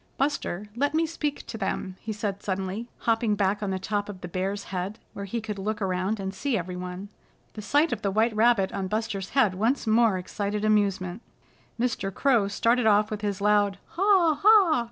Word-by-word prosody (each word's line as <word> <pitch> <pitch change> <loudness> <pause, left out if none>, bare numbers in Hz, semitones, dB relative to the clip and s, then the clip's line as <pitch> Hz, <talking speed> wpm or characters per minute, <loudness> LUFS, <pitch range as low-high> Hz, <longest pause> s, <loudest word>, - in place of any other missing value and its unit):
"Buster, 260 -8 -1
let 285 +4 0
me 325 +1 +3
speak 300 -3 -3
to 225 - -7
them," 190 -2 -3
he 225 - -5
said 205 -2 -3
suddenly, 195 +3 -3
hopping 225 -2 +1
back 200 0 0
on 205 - -2
the 190 - -1
top 205 +2 -2
of 190 -3 -8
the 180 - -5
Bear's 190 +3 -3
head 185 +4 -3 0.2
where 200 - -6
he 230 +4 -3
could 210 -2 -5
look 210 +2 -2
around 190 +2 -1
and 190 0 -4
see 255 +4 -1
everyone. 180 +2 -5 0.4
The 215 - -7
sight 290 +8 +2
of 215 - -4
the 200 - 0
white 220 +3 +1
rabbit 220 -3 +3
on 195 -1 -2
Buster's 210 -2 -3
head 220 -8 +4
once 225 +9 0
more 220 -2 +3
excited 205 +3 -3
amusement. 200 -2 +1 0.6
Mr. 225 -5 -1
Crow 235 -2 +2
started 230 +3 +2
off 210 0 +4
with 210 -1 -4
his 205 -2 -2
loud 205 -1 +3
"Ha! 360 -5 +3
Ha!" 400 - +6
210 Hz, 195 wpm, -26 LUFS, 195-235 Hz, 0.6 s, Ha